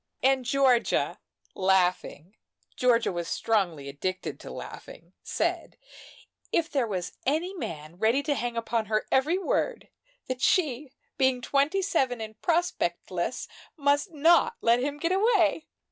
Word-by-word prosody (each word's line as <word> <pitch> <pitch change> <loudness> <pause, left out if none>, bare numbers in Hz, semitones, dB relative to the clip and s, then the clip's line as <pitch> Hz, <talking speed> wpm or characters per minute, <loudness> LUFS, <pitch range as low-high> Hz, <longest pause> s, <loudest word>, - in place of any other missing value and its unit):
And 265 -1 +3
Georgia, 255 -2 +2 0.3
laughing 185 -1 0 0.4
Georgia 240 -3 +2
was 175 -2 -4
strongly 175 -10 0
addicted 185 +7 -4
to - - -10
laughing - - -10
said - - -2 0.7
if 335 -1 0
there 265 -5 +1
was 185 -4 -3
any 320 +7 0
man 165 - -7
ready 230 +6 +2
to 295 0 +1
hang 240 -3 -3
upon 230 -1 -1
her 215 0 0
every 295 +7 +3
word, 445 +6 -1 0.4
that 255 0 -4
she, 290 -4 +1 0.3
being 260 -1 +3
twenty 285 +9 +1
seven 265 -10 0
and 220 0 -8
prospectless, 235 - -1 0.3
must 285 +5 +1
not 330 +8 +4
let 235 +1 +3
him 285 +3 -2
get 335 +4 -1
away. 380 -6 +2
255 Hz, 130 wpm, -27 LUFS, 215-310 Hz, 0.7 s, not